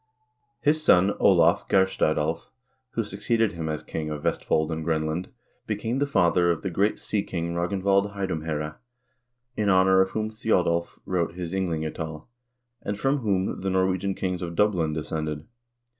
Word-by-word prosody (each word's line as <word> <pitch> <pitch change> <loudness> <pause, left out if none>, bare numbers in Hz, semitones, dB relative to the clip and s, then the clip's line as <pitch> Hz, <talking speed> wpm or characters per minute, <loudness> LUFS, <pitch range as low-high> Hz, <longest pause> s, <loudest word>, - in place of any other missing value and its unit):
His 155 +2 +2
son 95 -6 +5
Olav - - +4
Geirstad 95 -5 +2
Alv, 80 +3 -2 0.4
who 115 - 0
succeeded 105 +2 0
him 80 -2 -4
as 75 -1 -3
king 80 -1 -4
of 75 -1 -5
Vestfold 80 -1 0
and 80 0 -3
Grenland, 80 +2 -1 0.4
became 110 +4 -2
the 145 - +1
father 90 -8 +3
of 85 - 0
the 95 - -2
great 100 +5 +1
sea 105 - -1
king 85 -3 -3
Ragnvald 100 +3 +1
Heidumhsere, 80 -5 -3 0.8
in 105 -2 +1
honor 95 0 +5
of 95 - +2
whom 110 +1 -2
Thjodolv 90 -6 0
wrote 85 -3 -1
his 90 -1 -5
"Ynglingatal," 80 -4 -3 0.6
and 100 0 -3
from 135 +4 +2
whom 100 -6 -1
the 95 - -1
Norwegian 95 +1 +1
kings 90 -2 -2
of 85 -1 -4
Dublin 90 -6 +2
descended. 75 -1 -3
90 Hz, 155 wpm, -26 LUFS, 80-100 Hz, 0.8 s, son